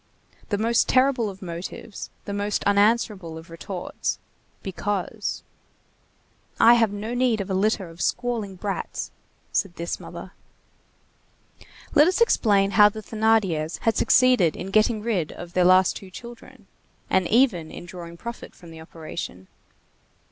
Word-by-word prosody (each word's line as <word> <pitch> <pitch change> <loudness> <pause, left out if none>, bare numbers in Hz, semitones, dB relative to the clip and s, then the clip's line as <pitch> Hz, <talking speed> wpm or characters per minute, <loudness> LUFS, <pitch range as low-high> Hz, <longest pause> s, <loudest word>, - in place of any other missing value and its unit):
The 205 - 0
most 230 +2 +2
terrible 255 -4 +3
of 190 0 -10
motives, 175 +4 -7 0.2
the 200 - -4
most 205 0 -1
unanswerable 200 -4 +2
of 165 +1 -12
retorts—Because. 190 +4 -5 1.2
"I 235 - +8
have 230 -3 +3
no 210 +3 -5
need 245 -3 +2
of 195 -1 -4
a - - +1
litter 195 0 +1
of 165 +1 -11
squalling 230 -6 -1
brats," 195 +1 -4 0.4
said 195 -4 -1
this 170 +1 -4
mother. - - -9 1.6
Let 295 +2 +6
us 370 - +1
explain 205 - +3
how 210 -1 +7
the 215 +1 -9
Thénardiers 205 -8 +1
had 225 -2 +1
succeeded 250 -11 +4
in 190 +2 -6
getting 215 +1 +2
rid 195 -9 -1
of 175 0 -10
their 180 -1 +3
last 185 +1 +5
two 195 - -11
children; 235 +5 -12 0.4
and 185 -2 +2
even 215 -10 +2
in - - -9
drawing 170 -2 -9
profit 235 +5 -8
from 170 -3 -14
the 160 0 -11
operation. 160 - -8
200 Hz, 140 wpm, -24 LUFS, 175-225 Hz, 1.6 s, I